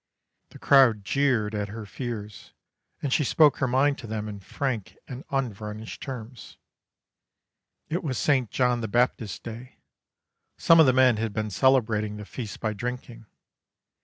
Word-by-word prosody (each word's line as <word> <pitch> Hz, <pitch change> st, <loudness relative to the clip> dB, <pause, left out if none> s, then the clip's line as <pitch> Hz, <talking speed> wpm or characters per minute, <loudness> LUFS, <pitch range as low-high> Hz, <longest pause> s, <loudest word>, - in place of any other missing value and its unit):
The -, -, -13 dB
crowd 120 Hz, -7 st, +4 dB
jeered 125 Hz, -5 st, +1 dB
at 105 Hz, -1 st, -2 dB
her 110 Hz, +1 st, -8 dB
fears, 105 Hz, -2 st, -7 dB, 0.5 s
and 135 Hz, -3 st, 0 dB
she 150 Hz, -, +2 dB
spoke 150 Hz, +2 st, +4 dB
her 130 Hz, -, 0 dB
mind 135 Hz, +3 st, +2 dB
to 115 Hz, -, -9 dB
them 110 Hz, -1 st, -4 dB
in 105 Hz, -1 st, -7 dB
frank 120 Hz, 0 st, -4 dB
and 130 Hz, +1 st, -8 dB
unvarnished 110 Hz, -4 st, -4 dB
terms. 125 Hz, -3 st, -8 dB, 1.3 s
It 170 Hz, +4 st, -3 dB
was 130 Hz, -6 st, -2 dB
St. 130 Hz, -6 st, +1 dB
John 125 Hz, -2 st, +1 dB
the 110 Hz, -, -3 dB
Baptist's 115 Hz, -2 st, 0 dB
Day. 120 Hz, +3 st, -10 dB, 0.8 s
Some 165 Hz, 0 st, +5 dB
of 160 Hz, -, +7 dB
the -, -, +6 dB
men 130 Hz, -3 st, +4 dB
had 110 Hz, -1 st, -2 dB
been 110 Hz, -1 st, -3 dB
celebrating 110 Hz, -4 st, +2 dB
the 105 Hz, -, -8 dB
feast 110 Hz, -1 st, -7 dB
by 110 Hz, -2 st, -2 dB
drinking. 120 Hz, 0 st, -6 dB
120 Hz, 155 wpm, -26 LUFS, 105-130 Hz, 1.3 s, of